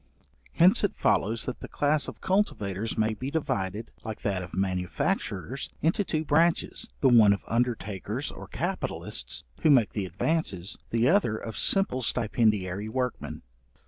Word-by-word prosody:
Hence - - +5
it - - +1
follows, 110 +3 +1
that 125 - -4
the - - -8
class 145 +1 +1
of - - -9
cultivators 110 - -1
may 110 0 +2
be 130 +5 -5
divided, 105 - -2
like 110 -2 -6
that 95 -2 0
of 90 -1 -8
manufacturers, 95 - -2
into 165 +6 +1
two 160 -4 -2
branches, 165 +3 +2
the 135 - +5
one 110 -4 +7
of 100 - -5
undertakers 115 -5 -2
or - - -10
capitalists, - - -3 0.2
who - - +4
make 125 -7 +5
the 100 -3 -2
advances, 100 - -1
the 115 +1 +2
other 165 - +3
of 110 -1 -7
simple 195 -10 +3
stipendiary 105 -4 +1
workmen. 125 +1 -3
115 Hz, 145 wpm, -27 LUFS, 100-140 Hz, 0.2 s, one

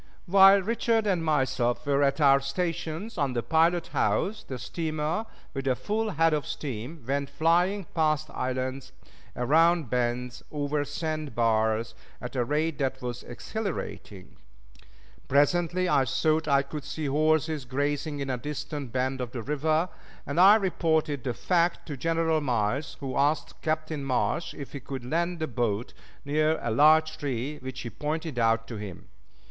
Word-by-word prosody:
While 195 +1 +7
Richard 225 +1 +1
and 185 -5 +1
myself 130 -5 +1
were 140 0 +2
at 140 +2 +2
our 140 -2 +6
stations 165 +7 -3
on 140 -3 +1
the 120 -1 -1
pilot 165 +1 +2
house, 210 +2 0
the 130 - -6
steamer, 155 - -2 0.3
with 135 -1 -4
a 130 - +3
full 215 - -1
head 165 -3 +2
of 150 -2 -1
steam, 135 +2 -5
went 140 +1 -1
flying 175 +5 +2
past 155 -1 +1
islands, 130 +1 -3 0.4
around 160 +2 +3
bends, 125 0 -1
over 145 0 -1
sand 155 0 -4
bars, 110 -1 +1 0.3
at 125 +2 -7
a 125 - +2
rate 150 +3 -1
that 135 -1 -1
was 120 -1 -4
exhilarating. 120 - -6 0.9
Presently 175 +6 +2
I 135 -6 +3
thought 155 +5 +1
I 140 -1 +4
could 145 +1 -7
see 150 +2 -5
horses 155 0 +1
grazing 145 +3 -2
in 135 -1 -2
a 125 - -1
distant 145 -1 -5
bend 130 +1 -1
of 125 -1 -5
the 120 -3 -4
river, 155 +4 +1 0.4
and 145 +4 -2
I 195 +3 +9
reported 160 - 0
the 125 -3 -2
fact 175 -1 +1
to 150 - -5
General 165 +2 +1
Miles, 125 +2 -1
who 135 -2 -4
asked 145 +1 0
Captain 155 -2 -2
Marsh 135 +5 -1
if 140 - -8
he 140 - -5
could 130 -1 -7
land 170 +6 -1
the 160 - -1
boat 120 -4 -2 0.3
near 155 +2 +2
a 120 - -1
large 155 +6 +4
tree 140 +1 -3
which 130 0 -7
he 120 - -6
pointed 155 -2 -3
out 115 0 +2
to 115 - -6
him. 100 -4 -8
145 Hz, 160 wpm, -27 LUFS, 130-160 Hz, 0.9 s, I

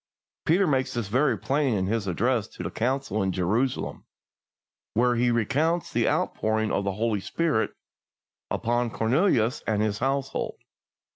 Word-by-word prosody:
Peter 180 +5 +4
makes 130 -6 0
this 115 -4 -2
very 130 +1 +2
plain 135 -4 +1
in 95 -2 0
his 105 0 -1
address 110 +4 +1
to - - -9
the - - -4
Council 130 -2 -1
in 95 -1 +1
Jerusalem, 105 +9 -1 0.9
where 120 +2 +3
he 120 +1 +2
recounts 145 +9 +1
the - - +2
outpouring 110 0 0
of 100 - 0
the 100 - 0
Holy 110 +1 0
Spirit 155 - 0 0.7
upon 120 +1 0
Cornelius 120 - +2
and 105 -1 +1
his 105 0 -1
household. 135 0 -1
120 Hz, 145 wpm, -26 LUFS, 110-135 Hz, 0.9 s, Peter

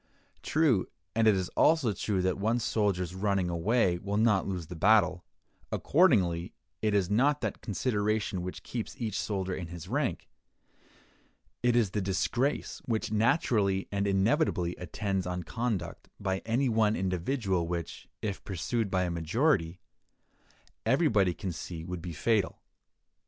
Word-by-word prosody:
True, 145 -11 +2 0.3
and 115 0 +3
it 105 - +6
is 95 -1 -2
also 150 -9 +3
true 95 0 -1
that 95 +1 0
one 110 +4 +1
soldier's 100 -6 0
running 95 -2 0
away 90 +1 +2
will 100 +2 -2
not 105 -3 +3
lose 90 -4 -3
the 90 +3 -8
battle; 95 -1 +3 0.5
accordingly, 95 - +2 0.3
it 105 -1 +1
is 95 -3 +2
not 140 +7 +3
that - - -3
consideration 105 -3 -1
which 90 +1 -6
keeps 115 -3 -5
each 110 -5 -2
soldier 95 -3 -2
in 90 -2 -4
his 85 -1 -8
rank: - - -1 1.3
it 120 -1 +3
is 115 -6 +3
the 105 - -1
disgrace 120 +9 -1
which 110 -3 -1
naturally 105 - +2
and 100 0 0
inevitably 95 - +1
attends 95 +1 -2
on 90 0 -3
conduct 110 -3 -3
by 95 -1 -1
any 125 +4 +2
one 110 -2 +2
individual 95 0 -1
which, 85 -1 -5 0.2
if 100 -3 -3
pursued 105 +3 -2
by 95 -1 +1
a 90 - -1
majority, 85 - +1 1.0
everybody 110 - +3
can 95 - -4
see 80 0 -6
would 90 0 -5
be 85 +1 -5
fatal. 100 +4 0
100 Hz, 145 wpm, -29 LUFS, 90-115 Hz, 1.3 s, it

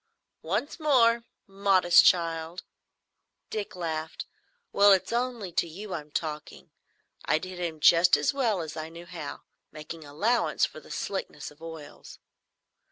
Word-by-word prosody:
"Once 210 - -3
more, 235 -6 +3 0.2
modest 195 -3 +4
child!" 165 0 +1 0.9
Dick 210 -3 -4
laughed. 160 -2 -4 0.5
"Well, 200 0 +7
it's 190 +2 0
only 240 -6 -2
to 170 - 0
you 190 +4 -8
I'm 150 -2 -6
talking. 155 0 -5 0.5
I - - +3
did 185 +2 -7
him 165 -3 -4
just 170 +3 +6
as - - 0
well 230 -9 0
as 160 -2 -7
I 155 0 -5
knew 170 +1 -11
how, 170 -5 -8 0.3
making 155 +1 -9
allowance 200 +12 +1
for - - -9
the - - -17
slickness 190 -7 -5
of 150 +2 -21
oils. 160 -2 -10
175 Hz, 140 wpm, -27 LUFS, 160-200 Hz, 0.9 s, Well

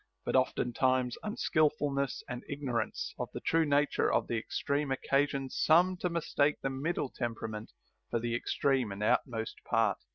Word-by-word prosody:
But - - -1
oftentimes 125 +1 +2
un 210 +1 -4
ekilfulness 145 - +1
and 125 0 -5
ignorance 130 -6 -2
of - - -3
the - - -4
true 165 0 +2
nature 145 0 +2
of - - +2
the 120 - -2
extreme 140 +5 -1
occasions 135 0 0
some 180 +4 +5
to 180 - -1
mistake 150 -3 +1
the 135 - 0
middle 140 +1 -2
temperament 110 -3 -4 0.4
for 115 - 0
the 120 0 -2
extreme 125 -1 +1
and 100 +2 -4
outmost 115 0 0
part. 115 -3 +2
135 Hz, 155 wpm, -31 LUFS, 120-145 Hz, 0.4 s, some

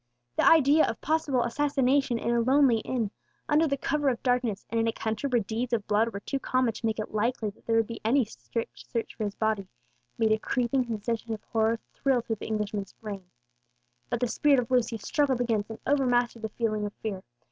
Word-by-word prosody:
The - - +3
idea 310 -1 +6
of 225 - -4
possible 295 -5 +1
assassination 270 -1 +1
in 235 +1 -1
a 235 - +3
lonely 260 -1 +4
inn, 225 -3 -2 0.4
under 310 +2 +3
the 280 -1 0
cover 290 +1 +1
of 240 -3 -3
darkness, 245 -5 0
and 230 - +1
in 225 - +2
a - - +2
country 225 +5 -3
where 245 -3 +2
deeds 230 +4 -3
of 215 -3 0
blood 215 +2 +2
were 200 - -6
too 275 - -3
common 255 -3 +1
to 225 - -6
make 220 - -1
it 215 - -5
likely 220 0 0
that - - -27
there 230 - +2
would 225 0 +4
be 230 +1 -8
any 245 +3 +3
strict 230 +2 -6
search 230 -2 -3
for 215 - -3
his 205 0 -4
body, 220 -3 0 0.5
made 220 -1 +2
a 215 - +3
creeping 250 +2 0
sensation 225 0 -3
of 210 - -14
horror 225 0 +1 0.2
thrill 265 -3 +1
through 225 -1 -3
the - - -7
Englishman's 210 -2 -3
frame. 200 -4 -8 0.8
But 235 - -2
the 245 - +2
spirit 280 +4 +3
of 245 0 -3
Lucius 235 -3 +1
struggled 280 -4 +1
against 225 -4 0
and 225 - -6
overmastered 245 -4 +2
the 220 - -3
feeling 215 -2 -1
of 205 - -9
fear. 200 -4 -4
230 Hz, 215 wpm, -28 LUFS, 220-255 Hz, 0.8 s, idea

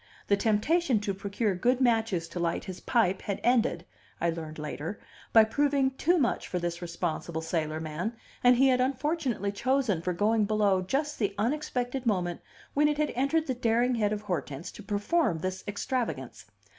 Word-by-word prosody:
The 200 - +6
temptation 230 - +2
to 205 -1 -1
procure 200 +2 -1
good 245 +8 +1
matches 225 -9 +2
to 175 - -5
light 170 -1 -1
his 185 -1 -7
pipe 195 -6 +1
had 200 -2 -3
ended 235 -8 +2 0.3
(I 170 0 +1
learned 160 -2 -6
later) 150 +4 -5 0.3
by 225 - +8
proving 275 +3 +2
too 340 +7 +2
much 265 -7 0
for 180 - -2
this 175 0 -3
responsible 170 -1 -3
sailor 160 -1 -1
man, 160 +8 -3 0.3
and 245 0 +7
he 270 +2 +5
had 250 -1 +3
unfortunately 265 -5 0
chosen 235 -4 +1
for 180 +1 -1
going 210 +4 +2
below 205 -3 +2
just 285 +10 -2
the 205 -3 0
unexpected 250 +1 -1
moment 180 -5 0 0.3
when 295 +1 +4
it 295 -1 0
had 300 -1 +1
entered 280 +5 +1
the 260 - -1
daring 240 +1 +2
head 210 -3 +1
of 210 0 -3
Hortense 170 -6 -4
to - - -11
perform 205 - +1
this 185 +3 -4
extravagance. 205 - -3
210 Hz, 175 wpm, -29 LUFS, 180-255 Hz, 0.3 s, by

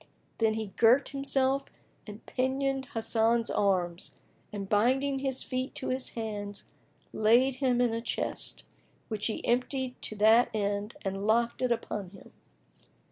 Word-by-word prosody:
Then 220 -1 +2
he 220 -3 -4
girt 245 +4 +5
himself 275 0 0 0.4
and 210 +1 -10
pinioned 270 +1 -1
Hasan's 225 +1 +2
arms 180 -3 0 0.3
and 200 -2 -5
binding 260 +7 +2
his 265 -1 0
feet 255 +1 -3
to 290 - -4
his 255 0 0
hands 205 -2 -5 0.5
laid 245 +5 +3
him 255 -2 +1
in 245 -2 +2
a 230 - -2
chest, - - -3 0.5
which 215 -2 -1
he 220 - -4
emptied 255 +1 -1
to 215 - -4
that 220 +3 +5
end 205 +1 -2
and 195 +1 -3
locked 235 +3 +2
it 250 -1 +1
upon 210 -4 -2
him. 195 +1 -16
230 Hz, 140 wpm, -29 LUFS, 210-260 Hz, 0.5 s, girt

